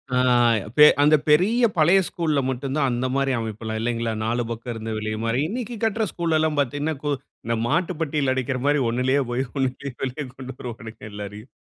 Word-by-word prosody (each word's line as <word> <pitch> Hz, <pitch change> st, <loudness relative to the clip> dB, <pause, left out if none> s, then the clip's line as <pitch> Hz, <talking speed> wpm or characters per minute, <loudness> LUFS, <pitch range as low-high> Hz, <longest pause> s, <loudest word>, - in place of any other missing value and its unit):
ஆ, -, -, +3 dB, 0.6 s
பெ 150 Hz, -, +10 dB, 0.2 s
அந்த 150 Hz, +1 st, +6 dB
பெரிய 215 Hz, +11 st, +4 dB
பழைய 170 Hz, +5 st, +5 dB
ஸ்கூல்ல 160 Hz, -6 st, 0 dB
மட்டும் 130 Hz, +1 st, -3 dB
தான் 140 Hz, -3 st, +2 dB
அந்த 120 Hz, +2 st, -1 dB
மாரி 135 Hz, 0 st, +1 dB
அமைப்புல்லாம் 110 Hz, 0 st, -4 dB
இல்லைங்களா, 115 Hz, -1 st, -1 dB
4 120 Hz, +2 st, 0 dB
பக்கம் 115 Hz, +1 st, -5 dB
இருந்து 115 Hz, 0 st, -5 dB
வெளிய 110 Hz, 0 st, -3 dB
மாரி 115 Hz, +3 st, 0 dB
இன்னைக்கு 240 Hz, +2 st, -4 dB
கட்ற 225 Hz, 0 st, +1 dB
ஸ்கூல் 165 Hz, -2 st, 0 dB
எல்லாம் 155 Hz, -1 st, 0 dB
பார்த்தீங்கன்னா, 145 Hz, +3 st, -1 dB
கோ 150 Hz, -, -1 dB
இப்போ -, -, -27 dB, 0.3 s
இந்த 115 Hz, -, +1 dB
மாட்டு 170 Hz, +6 st, +1 dB
பெட்டியல 145 Hz, -3 st, 0 dB
அடிக்கிற 130 Hz, 0 st, -1 dB
மாரி 145 Hz, 0 st, +3 dB
ஒண்ணுலேயே 130 Hz, +4 st, +1 dB
போய் 125 Hz, +2 st, 0 dB
ஒண்ணுலேயே 135 Hz, 0 st, -2 dB
வெளியே 135 Hz, +3 st, -3 dB
கொண்டு 130 Hz, -1 st, -7 dB
வருவாங்க 115 Hz, -2 st, -8 dB
எல்லாரையும். 105 Hz, +3 st, -8 dB
135 Hz, 185 wpm, -23 LUFS, 115-155 Hz, 0.6 s, பெ